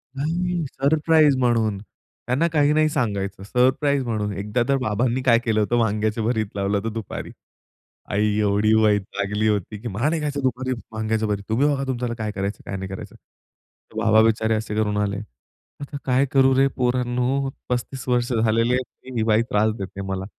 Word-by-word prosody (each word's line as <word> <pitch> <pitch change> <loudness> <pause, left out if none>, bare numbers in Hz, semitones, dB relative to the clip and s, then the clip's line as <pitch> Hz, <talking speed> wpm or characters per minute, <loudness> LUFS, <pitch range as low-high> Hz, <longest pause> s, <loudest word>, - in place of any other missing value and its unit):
नाही, 170 +4 -1
सरप्राईज 150 0 +3
म्हणून, 115 -5 +1
त्यांना 125 +7 -3
काही 150 -1 +3
नाही 155 0 +3
सांगायचं. 100 -7 -2
सरप्राईज 130 +5 +2
म्हणून 105 -3 -2
एकदा 105 +5 -1
तर 135 - +3
बाबांनी 120 +3 0
काय 115 -3 +5
केलं 110 -2 +1
होतं, 110 +3 +1
वांग्याचं 110 0 0
भरीत 110 -2 +1
लावलं 100 +1 0
होतं 110 +2 -3
दुपारी. 110 -3 -6 0.8
आई 105 0 +1
एवढी 105 +1 +2
वैतागली 105 0 0
होती, 105 0 -1
की 120 - -5
"मला 120 +7 0
नाही 160 0 -1
खायचं 145 -1 -2
दुपारी 130 0 -1 0.2
वांग्याचं 110 0 -1
भरीत. 100 -1 -2
तुम्ही 130 +7 +2
बघा 140 -2 0
तुमच्याला 125 -2 -2
काय 110 -1 -2
करायचं, 100 0 -4
काय 100 - -5
नाही 95 0 -6
करायचं." 95 - -8 0.8
बाबा 110 -1 +4
बिचारे 110 0 +2
असे 110 -1 -3
करून 105 -1 0
आले, 100 -1 -1 0.6
"आता 140 0 -6
काय 130 +1 +3
करू 135 -1 +4
रे 135 +1 +5
पोरांनो, 125 +2 0 0.2
35 125 +1 -3
वर्ष 125 0 +1
झालेले 115 +1 +2
आहेत, 130 0 0 0.2
तरी 130 -1 -10
ही 110 - +1
बाई 110 0 +3
त्रास 110 +1 +2
देते 100 0 -6
मला." 95 -1 -4
115 Hz, 175 wpm, -23 LUFS, 105-130 Hz, 0.8 s, काय